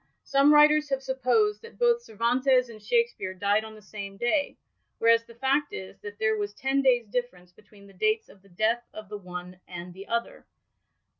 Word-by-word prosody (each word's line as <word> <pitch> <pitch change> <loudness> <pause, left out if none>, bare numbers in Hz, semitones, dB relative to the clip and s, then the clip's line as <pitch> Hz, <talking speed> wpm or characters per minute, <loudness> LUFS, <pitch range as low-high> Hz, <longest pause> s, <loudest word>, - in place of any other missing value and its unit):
"Some 275 +2 +4
writers 300 0 +6
have 270 -1 -1
supposed 265 - +1
that 460 0 -13
hoth 475 -1 +3
Cervantes 250 - +1
and 215 -2 -12
Shakspeare 465 - 0
died 205 +3 +1
on 220 0 -10
the 215 - -15
same 200 -1 -8
day, 285 +7 0 0.4
whereas 230 0 +4
the 235 - -15
fact 275 +4 0
is, 190 +1 -8
that 205 0 -9
there 220 0 +1
was 205 -1 -4
ten 270 +1 0
days* 250 -3 +3
difference 205 -6 -4
between 205 +1 -19
the 200 - -16
dates 435 - 0
of 195 - -19
the 195 - -22
death 220 +6 +1
of 215 -3 -9
the 210 - -5
one 180 -1 -8
and 175 0 -8
the 195 +2 -11
other. 235 0 -3
230 Hz, 195 wpm, -27 LUFS, 200-275 Hz, 0.4 s, writers